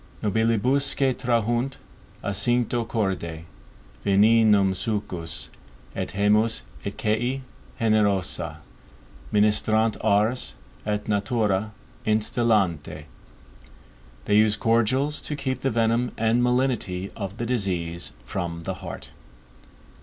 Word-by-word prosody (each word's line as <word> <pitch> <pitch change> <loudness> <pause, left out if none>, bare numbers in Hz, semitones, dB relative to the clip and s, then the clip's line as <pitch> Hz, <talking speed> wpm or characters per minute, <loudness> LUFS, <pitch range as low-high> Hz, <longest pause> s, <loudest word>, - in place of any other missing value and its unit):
NOBILIBUSQUE 125 +6 +2
TRAHUNT, 120 +1 0 0.5
A 100 - -1
CINCTO 120 +2 +1
CORDE, 95 -8 -2 0.6
VENENUM, 105 -1 +5
SUCCIS 95 -6 -3 0.4
ET - - -3
GEMMIS, 105 - +2 0.2
ET - - -5
QUÆ 120 +5 0 0.4
GENEROSA, 95 -8 +1 0.7
MINISTRANT 110 +1 +2
ARS, 105 - +1 0.3
ET 105 0 -1
NATURA, 105 0 0 0.3
INSTILLANT. 110 -5 +2 1.4
_They 105 - +2
use 105 0 +5
cordials, 120 +7 +1
to 150 - -4
keep 130 -2 -2
the 135 - 0
venom 115 +1 +1
and 115 +2 +2
malignity 125 -7 0
of 100 -1 -5
the 120 - -2
disease 90 -8 -2
from 85 +2 -4
the - - -3
heart. - - -8
110 Hz, 95 wpm, -25 LUFS, 100-120 Hz, 1.4 s, VENENUM